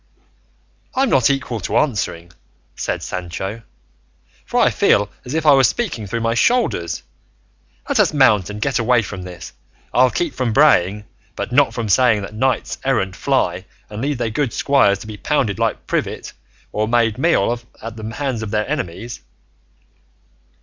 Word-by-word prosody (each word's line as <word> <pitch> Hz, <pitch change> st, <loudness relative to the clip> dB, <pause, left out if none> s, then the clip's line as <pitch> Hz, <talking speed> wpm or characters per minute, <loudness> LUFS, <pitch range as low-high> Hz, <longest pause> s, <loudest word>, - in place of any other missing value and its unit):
"I'm 265 Hz, -1 st, +2 dB
not 130 Hz, -1 st, +4 dB
equal 130 Hz, -4 st, -1 dB
to 90 Hz, -, -1 dB
answering," 90 Hz, -, -1 dB, 0.4 s
said -, -, -3 dB
Sancho, 95 Hz, +5 st, -5 dB, 0.9 s
"for -, -, 0 dB
I -, -, +4 dB
feel 105 Hz, -, +2 dB
as 125 Hz, +5 st, -4 dB
if 160 Hz, 0 st, -1 dB
I 150 Hz, -, +7 dB
was 135 Hz, -3 st, +6 dB
speaking 165 Hz, -, -3 dB
through 115 Hz, +4 st, -3 dB
my 115 Hz, 0 st, +1 dB
shoulders; 240 Hz, -, +1 dB, 0.8 s
let 280 Hz, -5 st, +1 dB
us 205 Hz, -, +4 dB
mount 110 Hz, -, +4 dB
and 105 Hz, 0 st, -6 dB
get 130 Hz, +4 st, 0 dB
away 115 Hz, 0 st, +3 dB
from 95 Hz, -2 st, -7 dB
this; 90 Hz, -2 st, -9 dB, 0.4 s
I'll 130 Hz, +1 st, +5 dB
keep 165 Hz, +6 st, -2 dB
from 125 Hz, -4 st, -1 dB
braying, 105 Hz, -8 st, +4 dB, 0.3 s
but -, -, -4 dB
not 140 Hz, +2 st, +3 dB
from 115 Hz, -2 st, -2 dB
saying 110 Hz, 0 st, +3 dB
that 100 Hz, -, -8 dB
knights 130 Hz, +4 st, -1 dB
errant 100 Hz, -9 st, 0 dB
fly -, -, 0 dB, 0.3 s
and 105 Hz, +1 st, -5 dB
leave 140 Hz, +1 st, -1 dB
their 120 Hz, -2 st, -2 dB
good 125 Hz, +1 st, -1 dB
squires 130 Hz, -8 st, +3 dB
to -, -, -8 dB
be 105 Hz, -1 st, -8 dB
pounded 110 Hz, -5 st, 0 dB
like -, -, -1 dB
privet, -, -, -3 dB, 0.4 s
or 110 Hz, +1 st, -1 dB
made 115 Hz, -1 st, +1 dB
meal 165 Hz, -5 st, +3 dB
of 120 Hz, -1 st, -5 dB
at 115 Hz, 0 st, -7 dB
the 110 Hz, 0 st, -7 dB
hands 135 Hz, -6 st, -2 dB
of 110 Hz, -, -4 dB
their 105 Hz, 0 st, -1 dB
enemies." 120 Hz, -, -4 dB
115 Hz, 170 wpm, -19 LUFS, 105-135 Hz, 0.9 s, I